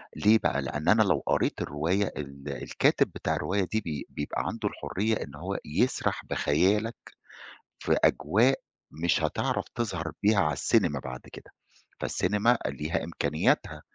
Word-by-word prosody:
ليه 110 +2 +5
بقى؟ - - +1
لأن 75 +1 -2
أنا 110 +1 +6
لو 95 - +1
قريت - - +1
الرواية 85 +8 0
ال 70 -1 -7
الكاتب - - +2
بتاع - - -1
الرواية 100 +1 0
دي 110 0 +1
بي 75 -4 -5
بيبقى 75 - -3
عنده - - -2
الحرية 110 +3 -1
إن 70 - -11
هو 90 +6 -4
يسرح 105 +13 0
بخيالك 100 +10 +1 0.8
في - - +1
أجواء 110 - +3 0.4
مش 85 - +3
هتعرف - - 0
تظهر 95 -8 -2
بيها 105 0 +4
على 75 -5 +2
السينما 70 - +2
بعد 65 -1 -7
كده، - - -12 0.5
فالسينما 105 +6 +2
ليها 75 +3 -2
إمكانياتها، 80 -2 0
85 Hz, 140 wpm, -28 LUFS, 75-105 Hz, 0.8 s, أنا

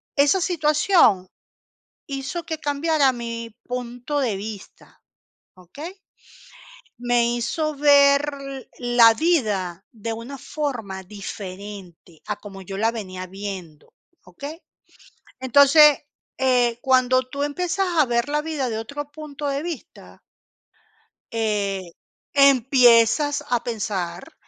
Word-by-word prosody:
esa 290 +6 +3
situación 300 - +3 0.8
hizo 280 +5 -4
que 320 -1 -4
cambiara 290 -2 +1
mi 230 -1 -6
punto 245 +3 -4
de 235 -7 0
vista, 205 0 -10 0.5
¿okey? 285 - -10 1.0
Me 240 -1 +1
hizo 305 +6 -2
ver 280 0 +5 0.6
la 240 -2 +6
vida 210 - 0
de 225 0 -5
una 245 +5 -8
forma 235 -13 -4
diferente 190 -3 -9
a 210 - -3
como 200 -2 -11
yo 195 +1 -7
la 225 +2 +2
venía 185 -5 -6
viendo, 185 -5 -8 0.3
¿okey? 285 - -9 0.8
Entonces, 285 +3 +6 0.4
eh, 245 -3 +2
cuando 255 -1 +3
tú 260 +2 -6
empiezas 360 +6 -1
a 305 - +6
ver 235 0 0
la 300 +1 0
vida 300 -5 -2
de 225 - -3
otro 285 +6 -6
punto 295 -1 -6
de 280 +1 -2
vista 335 -5 -9 1.1
eh, 200 -5 -2 0.4
empiezas 270 +1 +4
a 240 -2 0
pensar 190 -6 -4
245 Hz, 110 wpm, -23 LUFS, 210-290 Hz, 1.1 s, la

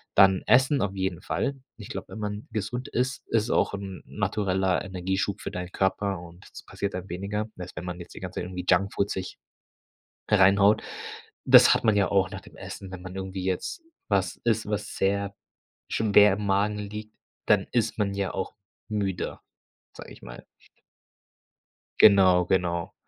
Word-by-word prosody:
Dann 95 -1 +6
Essen 130 +5 +4
auf 100 -1 -1
jeden 95 -3 -2
Fall. 140 +7 -2 0.2
Ich 105 - -9
glaube, - - -6
wenn - - -8
man 105 0 -4
gesund 110 +4 -4
isst, 125 +2 -2
ist 115 +1 +1
auch - - +2
'n 100 -2 -6
natureller 95 -2 0
Energieschub 95 +1 -2
für - - -5
deinen 90 0 -5
Körper 95 0 0
und 85 +1 -13
das - - -11
passiert 100 - -4
dann 90 +1 -6
weniger, 100 +4 -3
als 90 0 -7
wenn 80 - -6
man 90 0 -5
jetzt 85 - -12
die - - -8
ganze 90 -1 -6
Zeit - - -4
irgendwie 90 -1 -6
Junkfood 100 +2 +2
sich 95 -1 -5 0.9
reinhaut. 100 +1 +5 0.6
Das - - +8
hat - - -1
man 110 -2 +4
ja 100 -2 +3
auch 95 -2 +2
nach - - -7
dem - - -16
Essen, 95 -1 -8
wenn 90 -1 -8
man 95 +1 -8
irgendwie 95 -1 -5
jetzt 95 - -2 0.3
was 95 -4 0
isst, 110 -2 +1
was 105 -1 -3
sehr 100 0 0 0.5
schon 110 -2 -1
sehr 105 -1 +8
im 105 +1 -4
Magen 100 +2 +1
liegt, 105 +1 -7 0.3
dann 105 -2 +3
ist 115 -2 0
man 100 -2 0
ja 100 -1 -2
auch 95 - -4 0.3
müde, 100 -4 -2 0.5
sage - - -11
ich - - -17
mal. - - -10 1.6
Genau, 95 -3 +7
genau. 85 -2 0
100 Hz, 175 wpm, -26 LUFS, 95-105 Hz, 1.6 s, Das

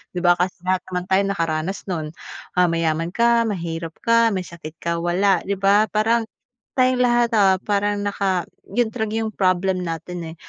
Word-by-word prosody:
'di - - -1
ba, 175 - +6
kasi 180 +1 0
lahat 185 0 +1
naman 180 -1 -3
tayo 190 - +5
nakaranas 165 0 -2
no'n. 160 -3 -3 0.5
Ah, 180 -1 +3
mayaman 165 0 0
ka, 235 +1 +3
mahirap 165 -3 -4
ka, 230 -1 +3
may 185 -2 -3
sakit 165 -1 -10
ka, 170 0 -1
wala, 190 +3 +2
'di 200 -1 -3
ba? 200 0 +3
Parang 225 +2 +2 0.5
tayong 255 -1 +3
lahat, 240 -1 +3
ah, 190 -2 +5
parang 205 0 0
naka 195 -3 -1 0.3
'yung 240 0 +2
talaga 220 -2 -3
'yung 220 - -2
problem 185 -1 +1
natin, 165 0 -5
eh. - - -16
190 Hz, 175 wpm, -22 LUFS, 170-215 Hz, 0.5 s, ba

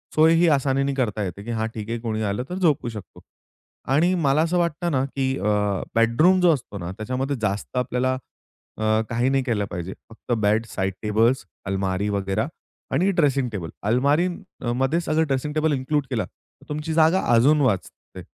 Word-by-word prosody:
सोयही 165 +2 +5
आसानीने 135 -1 +1
करता 110 -5 -1
येते, 100 +2 -5
की 120 - -5
हां 110 -1 -1
ठीक 110 0 -6
आहे 120 0 -2
कोणी 110 -2 -3
आलं 105 +4 -1
तर 180 - -4
झोपू 155 -9 +1
शकतो. 105 -5 -10 0.7
आणि 175 +6 +3
मला 150 -3 +2
असं 170 +2 +1
वाटतं 170 0 -1
ना, 130 -2 +1
की 135 -1 -2
अ, - - -6 0.5
बेडरूम 135 +12 +4
जो 175 -2 +6
असतो 115 -7 -5
ना 85 +1 -5
त्याच्यामध्ये 130 +5 -2
जास्त 105 +4 -2
आपल्याला 125 +1 0 0.6
अ, 110 0 +2
काही 120 +2 +1
नाही 135 -1 +1
केलं 110 -5 0
पाहिजे. 90 +2 -5 0.2
फक्त 115 +2 -10
बेड 110 +2 +2
साइड 95 -1 -2
टेबल्स 115 +5 +2 0.2
अलमारी 95 +1 -1
वगैरे 100 +2 -1 0.5
आणि 185 +8 +3
ड्रेसिंग 140 -7 +2
टेबल 90 -6 -5 0.2
अलमारीमध्ये 140 - 0
सगळं 160 0 +1
ड्रेसिंग 140 +2 -1
टेबल 155 0 +1
इन्क्लूड 140 +2 0
केला - - -1
तर - - -26
तुमची 150 +2 -3
जागा 165 +3 +4
अजून 145 +6 +5
वाचते. 105 -9 -2
130 Hz, 170 wpm, -23 LUFS, 110-155 Hz, 0.7 s, जो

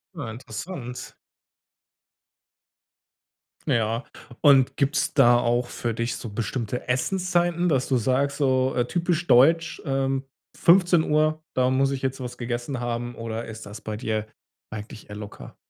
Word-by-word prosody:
Ja, 145 -9 -5
interessant. 125 - -7 2.5
Ja, 115 +2 +1 0.4
und 135 -3 +5
gibt's 140 0 0
da 120 -4 +6
auch 120 0 +1
für 120 -1 -3
dich 115 +1 -2
so 115 - -7
bestimmte 115 +3 -4
Essenszeiten, 175 +5 +1
dass 135 -5 +1
du 130 - +1
sagst, 130 +4 +1
so, 130 -2 +2
äh, 120 -1 +2
typisch 175 +2 0
deutsch, 160 +7 +4
ähm: 135 -1 0 0.3
„15:00, 160 -3 +4
da 130 0 +3
muss 135 +1 +2
ich 135 - -3
jetzt 135 0 -2
was 125 -2 -6
gegessen 120 +2 -3
haben“ 120 0 -3
oder 115 0 -5
ist 110 0 -9
das 105 +1 -9
bei 110 -1 -5
dir 110 -1 -2 0.4
eigentlich 110 0 -9
eher 105 - -7
locker? 105 -1 -9
130 Hz, 140 wpm, -25 LUFS, 115-145 Hz, 2.5 s, da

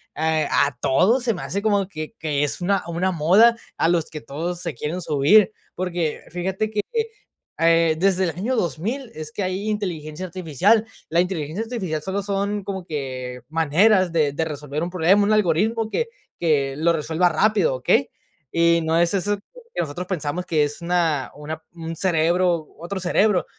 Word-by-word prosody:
a 155 -2 +2
a 135 -3 -7
todo, 195 - +3
se 235 -2 +1
me 175 - -6
hace 200 +2 -3
como 205 -3 +1
que 155 0 -7
que 145 -2 0
es 145 - -2
una 195 +2 +1
una 175 +3 0
moda 190 +9 +5 0.2
a 165 - +2
los 170 -2 +1
que 155 -2 -7
todos 170 +5 -4
se 170 -4 -3
quieren 155 +9 -3
subir. 170 +8 +4 0.2
Porque 175 -3 -2
fíjate 190 +4 -2
que, 210 - -2 0.8
eh, 165 -1 +4
desde 190 0 +3
el - - 0
año 215 +10 -2
2000 220 - -2
es 155 -1 -7
que 200 - -2
hay 185 +3 -2
inteligencia 175 -5 -3
artificial. 185 - +2 0.2
La 170 +2 +2
inteligencia 180 +1 -3
artificial 190 -10 -3
solo 190 +5 -2
son 200 +1 -1
como 190 -2 -5
que 130 -5 -5
maneras 175 +4 +3
de 150 -4 +2
de 160 +2 -1
resolver 150 0 -4
un 175 - -2
problema, 185 +3 +3
un 215 +1 +2
algoritmo 215 +4 +1
que 465 - -1 0.3
que 140 -5 +1
lo 165 +2 +3
resuelva 160 +3 +1
rápido, 190 -2 +2
¿okey? 130 +2 +2 0.4
Y 170 0 +4
no 160 +1 +1
es 170 +2 +2
eso 205 +2 +1
que 470 - -8
nosotros 170 +4 -5
pensamos, 175 -1 -3
que 155 -3 +2
es 145 +4 -6
una 170 -5 0
una 155 +2 -6
un 165 -1 -6
cerebro, 170 -1 +1
otro 190 +3 -4
cerebro. 185 +2 +2
175 Hz, 175 wpm, -22 LUFS, 155-195 Hz, 0.8 s, moda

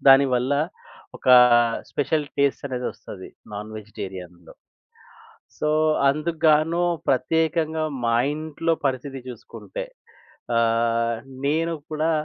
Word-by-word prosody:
దానివల్ల 135 -1 +5 0.7
ఒక - - -4 0.6
special 150 +1 0
taste 140 0 +1
అనేది 125 -1 -4
వస్తది 100 -3 -11 0.3
నాన్ 105 +1 -6
వెజిటేరియన్‌లో. 95 -4 -9 1.1
సో 150 - +1 0.4
అందుగ్గాను 155 +2 +2 0.3
ప్రత్యేకంగా 160 +4 +1 0.2
మా 115 - +2 0.2
ఇంట్లో 160 +2 -2
పరిస్థితి 135 0 -2
చూసుకుంటే, 125 - -8 0.7
ఆహ్, 115 0 +1 0.3
నేను 165 +3 +1 0.2
కూడా 155 +1 0
135 Hz, 90 wpm, -23 LUFS, 115-155 Hz, 1.1 s, దానివల్ల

